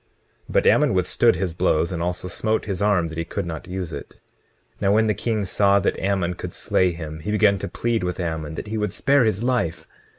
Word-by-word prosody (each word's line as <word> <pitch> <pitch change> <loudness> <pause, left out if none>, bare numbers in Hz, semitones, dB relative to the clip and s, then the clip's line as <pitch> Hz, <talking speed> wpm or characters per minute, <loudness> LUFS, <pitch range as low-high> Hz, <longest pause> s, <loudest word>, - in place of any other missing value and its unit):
But - - +2
Ammon - - +4
withstood - - +3
his 90 -1 -2
blows, 85 +1 +1
and 85 -2 -3
also 90 +1 -2
smote 110 +4 -1
his 100 -3 -3
arm 100 -5 +2
that 80 +1 -6
he - - 0
could 100 +3 -4
not 80 -3 -6
use 90 -3 -5
it. 70 - -9 0.6
20:21 - - -30
Now 100 0 +3
when 110 +1 +4
the 105 - +2
king 110 +1 -1
saw 100 +1 +3
that 100 - 0
Ammon 95 -2 0
could - - -7
slay 90 -1 +1
him, 80 -2 -7
he 95 - -6
began 105 -2 +3
to - - -4
plead 115 -4 -1
with 90 0 -3
Ammon 80 -3 -3
that - - -5
he 110 +1 -3
would 105 -3 -1
spare 140 -3 +3
his 110 0 0
life. 120 -10 -1
95 Hz, 230 wpm, -23 LUFS, 85-105 Hz, 0.6 s, Ammon